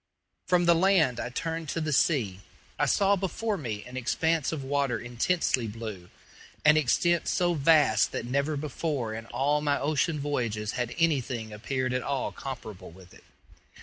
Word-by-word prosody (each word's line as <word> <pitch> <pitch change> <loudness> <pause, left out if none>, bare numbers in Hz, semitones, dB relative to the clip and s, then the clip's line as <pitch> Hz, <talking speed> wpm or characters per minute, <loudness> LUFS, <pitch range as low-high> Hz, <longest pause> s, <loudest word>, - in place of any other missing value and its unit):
From 180 -1 +3
the 170 - +6
land 170 -7 +3
I - - -3
turned 165 +4 -4
to 165 - -2
the 155 -2 -1
sea. 120 - +1 0.4
I - - +2
saw 200 0 +3
before 200 +3 -2
me 115 - -5
an 125 +1 -8
expanse 160 +5 0
of 155 -4 -4
water 140 -3 0
intensely 120 +2 0
blue 105 -5 -7 0.6
an 150 0 +7
extent 165 +4 +2
so 175 -1 +1
vast 145 -8 +4
that - - -4
never 140 +4 0
before 140 -5 -3
in 115 0 -7
all 145 +2 0
my 145 -1 +1
ocean 155 +2 0
voyages 115 -7 -2
had 120 -1 -3
anything 130 -9 0
appeared 130 +4 -2
at 125 - 0
all 140 -1 -2
comparable 120 -7 -8
with 90 +1 -16
it. - - -17
140 Hz, 165 wpm, -28 LUFS, 120-160 Hz, 0.6 s, an